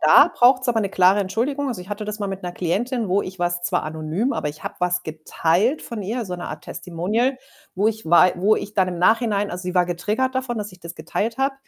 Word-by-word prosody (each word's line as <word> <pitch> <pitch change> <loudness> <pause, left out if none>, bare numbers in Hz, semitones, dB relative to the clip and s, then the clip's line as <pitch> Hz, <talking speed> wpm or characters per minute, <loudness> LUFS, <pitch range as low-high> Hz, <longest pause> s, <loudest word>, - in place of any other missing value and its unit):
da - - +7
braucht's 255 +1 +4
aber 230 -2 +2
'ne 200 - -1
klare 190 +2 +4
Entschuldigung. 255 +9 -1
Also, 210 -8 -4
ich 185 - -14
hatte 205 +1 -4
das 210 0 -4
mal 205 - -2
mit 195 -1 -5
'ner 175 -1 -4
Klientin, 220 +7 -1
wo 195 +3 +2
ich 185 0 -7
was, 175 0 0
zwar - - 0
anonym, 160 - -2
aber 150 - -2
ich 150 - -10
habe - - -4
was 180 0 0
geteilt 165 - 0
von 230 -2 -6
ihr, 230 +4 -3
so 180 -2 -5
'ne 175 - -6
Art 155 0 -8
Testimonial, 210 +10 -1 0.4
wo 200 +3 +1
ich 220 -5 -2
wei 175 +2 +6
wo 200 +5 +3
ich 205 - -5
dann 190 -3 +2
im 175 -2 -4
Nachhinein 210 0 +2
also, 180 +1 -5
sie 180 0 -3
war 180 -1 +4
getriggert 210 +9 -1
davon, 255 -2 -2
dass 210 -2 -5
ich 180 - -16
das 170 0 -8
geteilt 205 +8 -3
habe, 270 +1 0
195 Hz, 245 wpm, -22 LUFS, 175-230 Hz, 0.4 s, da